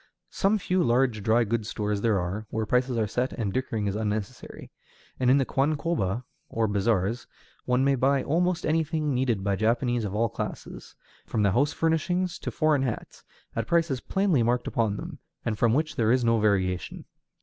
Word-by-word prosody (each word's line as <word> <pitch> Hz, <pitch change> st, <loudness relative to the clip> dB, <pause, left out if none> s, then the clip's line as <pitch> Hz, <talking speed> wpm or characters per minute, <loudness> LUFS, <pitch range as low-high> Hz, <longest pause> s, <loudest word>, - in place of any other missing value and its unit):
Some 200 Hz, +3 st, +2 dB
few 185 Hz, -2 st, 0 dB
large 120 Hz, -4 st, +2 dB
dry 110 Hz, +4 st, +3 dB
goods 110 Hz, 0 st, -2 dB
stores 105 Hz, -2 st, -2 dB
there 110 Hz, -3 st, +2 dB
are, 95 Hz, +5 st, -4 dB
where 110 Hz, 0 st, -2 dB
prices 125 Hz, +2 st, +1 dB
are 110 Hz, -, +2 dB
set 125 Hz, +5 st, -2 dB
and 105 Hz, -5 st, -3 dB
dickering 115 Hz, -4 st, -2 dB
is 100 Hz, 0 st, -1 dB
unnecessary;[*264] 110 Hz, +2 st, -4 dB, 0.5 s
and 125 Hz, -1 st, +2 dB
in 130 Hz, -, +6 dB
the 135 Hz, -, +2 dB
kwankoba, 135 Hz, -, 0 dB, 0.3 s
or 115 Hz, -1 st, 0 dB
bazaars, 105 Hz, +2 st, 0 dB, 0.4 s
one 125 Hz, +1 st, +2 dB
may 140 Hz, 0 st, +3 dB
buy 135 Hz, +1 st, +2 dB
almost 175 Hz, +3 st, 0 dB
anything 155 Hz, -2 st, 0 dB
needed 125 Hz, -6 st, 0 dB
by 100 Hz, -1 st, +1 dB
Japanese 120 Hz, +3 st, +1 dB
of 100 Hz, -1 st, -3 dB
all 115 Hz, +2 st, +2 dB
classes, -, -, -7 dB, 0.3 s
from 110 Hz, -, 0 dB
house 125 Hz, +9 st, +2 dB
furnishings 165 Hz, +3 st, 0 dB
to -, -, -4 dB
foreign 155 Hz, -3 st, +2 dB
hats, 125 Hz, -5 st, -4 dB, 0.3 s
at 115 Hz, -1 st, -2 dB
prices 165 Hz, -7 st, +1 dB
plainly 190 Hz, -9 st, +1 dB
marked 120 Hz, +1 st, +1 dB
upon 110 Hz, -3 st, 0 dB
them, -, -, -7 dB, 0.3 s
and 110 Hz, -3 st, -2 dB
from 120 Hz, 0 st, +3 dB
which 155 Hz, +2 st, 0 dB
there 115 Hz, -4 st, +2 dB
is 125 Hz, 0 st, +3 dB
no 115 Hz, -1 st, +3 dB
variation. 95 Hz, -4 st, 0 dB
120 Hz, 180 wpm, -26 LUFS, 110-140 Hz, 0.5 s, in